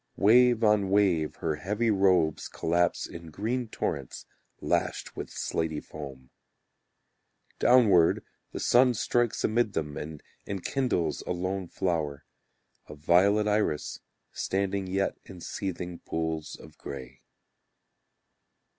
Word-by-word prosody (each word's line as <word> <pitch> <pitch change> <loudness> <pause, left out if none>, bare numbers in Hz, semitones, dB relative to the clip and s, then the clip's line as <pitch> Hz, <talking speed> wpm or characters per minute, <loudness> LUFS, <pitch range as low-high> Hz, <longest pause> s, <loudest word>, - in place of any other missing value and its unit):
Wave 120 +2 +5
on 105 -3 +3
wave 95 -6 +2
her 80 -2 -1
heavy 105 +7 0
robes 95 -6 +2
collapse 85 +1 0
In 85 -1 -9
green 115 +9 -2
torrents - - -4 0.3
Lashed - - -1
with - - -6
slaty 80 -2 -2
foam. 70 -5 -10 1.3
Downward 105 -10 +5 0.3
the - - -5
sun 125 0 +4
strikes 120 +1 0
amid 110 -1 +1
them 75 -2 -3
And 75 -1 -7 0.2
enkindles 95 - -1
a - - 0
lone 95 +1 -3
flower; 75 -6 -2 0.6
A - - -8
violet 95 +7 +3
iris 105 -8 0 0.3
standing 95 0 -1
yet 95 +1 -1
in 95 -2 -11
seething 90 -1 -5
pools 80 -1 -3
of 75 0 -15
grey. 65 -1 -8
95 Hz, 110 wpm, -28 LUFS, 80-105 Hz, 1.3 s, Wave